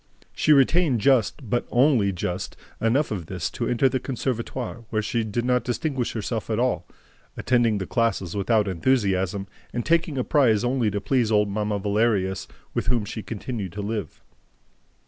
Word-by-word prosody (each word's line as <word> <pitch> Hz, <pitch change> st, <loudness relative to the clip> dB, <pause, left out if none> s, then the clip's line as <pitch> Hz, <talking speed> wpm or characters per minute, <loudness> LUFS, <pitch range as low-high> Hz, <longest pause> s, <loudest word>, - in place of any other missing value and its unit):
She 155 Hz, -, +2 dB
retained 145 Hz, -1 st, +4 dB
just, 130 Hz, +1 st, +2 dB
but 120 Hz, +3 st, -1 dB
only 125 Hz, -6 st, +3 dB
just, 90 Hz, +1 st, -4 dB, 0.2 s
enough 125 Hz, +6 st, +2 dB
of 90 Hz, -6 st, -4 dB
this 90 Hz, -4 st, -3 dB
to -, -, -3 dB
enter 125 Hz, +2 st, +3 dB
the 130 Hz, 0 st, 0 dB
CONSERVATOIRE, 125 Hz, -2 st, -4 dB
where 110 Hz, -, 0 dB
she 115 Hz, +2 st, -1 dB
did 110 Hz, +2 st, -2 dB
not 125 Hz, 0 st, +2 dB
distinguish 130 Hz, 0 st, -2 dB
herself 110 Hz, 0 st, -3 dB
at 110 Hz, -, 0 dB
all, 120 Hz, -8 st, 0 dB, 0.5 s
attending 120 Hz, -4 st, +2 dB
the 95 Hz, -, -3 dB
classes 110 Hz, -6 st, 0 dB
without 105 Hz, +1 st, +2 dB
enthusiasm 95 Hz, -1 st, +1 dB, 0.3 s
and 120 Hz, -, -3 dB
taking 160 Hz, -3 st, +1 dB
a 130 Hz, -, +1 dB
prize 120 Hz, -9 st, +3 dB
only 120 Hz, -2 st, +1 dB
to 100 Hz, 0 st, -2 dB
please 115 Hz, +2 st, +1 dB
old 105 Hz, -1 st, +3 dB
Mamma 105 Hz, 0 st, -1 dB
Valerius, 100 Hz, -2 st, 0 dB, 0.3 s
with -, -, -2 dB
whom 120 Hz, -3 st, +1 dB
she 110 Hz, +2 st, -5 dB
continued 105 Hz, -2 st, -5 dB
to 105 Hz, -, -4 dB
live. 105 Hz, -6 st, -4 dB
115 Hz, 165 wpm, -24 LUFS, 100-125 Hz, 0.5 s, retained